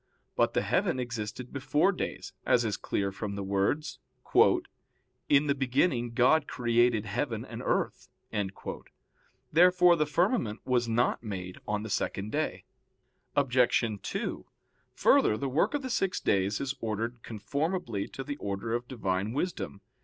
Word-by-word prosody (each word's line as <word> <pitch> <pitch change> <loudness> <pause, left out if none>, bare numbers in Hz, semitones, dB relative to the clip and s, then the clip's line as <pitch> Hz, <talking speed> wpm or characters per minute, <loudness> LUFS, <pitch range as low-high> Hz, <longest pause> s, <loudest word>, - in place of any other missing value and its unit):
But - - +2
the - - +2
heaven 130 - +1
existed 120 0 -5
before 140 +6 +2
days, 180 - -5
as 120 -1 +3
is 105 -3 0
clear 100 -1 -2
from 100 +1 -5
the 100 - -3
words, 100 +10 0 1.3
"In 145 +1 +5
the 140 - +2
beginning 125 -2 +1
God 145 +5 +4
created 120 -2 +2
heaven 115 +2 -2
and - - -7
earth." - - -1 1.4
Therefore 180 +1 +6
the 150 -2 +1
firmament 160 - +1
was 125 -2 +1
not 120 +2 +1
made 95 -5 -6
on 105 0 -1
the 110 - -6
second 100 +2 -2
day. 155 +1 -2 0.7
Obj. 130 -3 +3 0.2
2: - - -4 0.5
Further, 105 - +4
the 140 - -2
work 150 - +1
of 285 - -2
the 260 - -4
six 195 -5 0
days 100 +1 +1
is 140 -1 -2
ordered 115 +1 -3
conformably 120 - -2
to 135 - -7
the 145 +1 -5
order 100 +1 -3
of 120 +1 -2
Divine 100 -3 -2
wisdom. 145 - -3
120 Hz, 145 wpm, -29 LUFS, 105-145 Hz, 1.4 s, Therefore